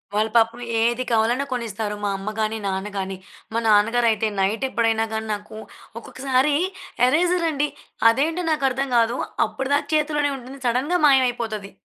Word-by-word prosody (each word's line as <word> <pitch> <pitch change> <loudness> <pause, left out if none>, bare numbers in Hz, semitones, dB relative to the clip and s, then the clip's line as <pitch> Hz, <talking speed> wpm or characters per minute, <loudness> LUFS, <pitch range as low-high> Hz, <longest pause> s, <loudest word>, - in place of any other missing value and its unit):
వాళ్ళు 215 +1 +1
పాపం 230 +1 +2 0.2
ఏది 240 +2 +1
కావాలన్నా 235 +4 +2
కొనిస్తారు, 220 -3 -3
మా 205 - +1
అమ్మ 195 +2 -5
గానీ, 215 +1 0
నాన్న 190 +1 -2
గానీ. 190 0 -3 0.4
మా 230 - +1
నాన్నగారయితే, 220 +1 +3
నైటెప్పుడైనా 225 +2 +1
గాని 220 0 -3
నాకూ 210 +1 -8 0.4
ఒక్కొక్కసారి 265 +3 0 0.5
ఎరేజరండి, 325 -1 +1 0.4
అదేంటో 320 +8 -1
నాకర్థం 275 -2 0
గాదు, 230 +1 +2 0.3
అప్పుడిదాకా 275 +2 -1
చేతులోనే 295 -1 +1
ఉంటుంది, 260 +2 -11
సడన్‌గా 270 +9 +1
మాయమైపోతది. 235 -6 +1
235 Hz, 125 wpm, -22 LUFS, 220-275 Hz, 0.5 s, నాన్నగారయితే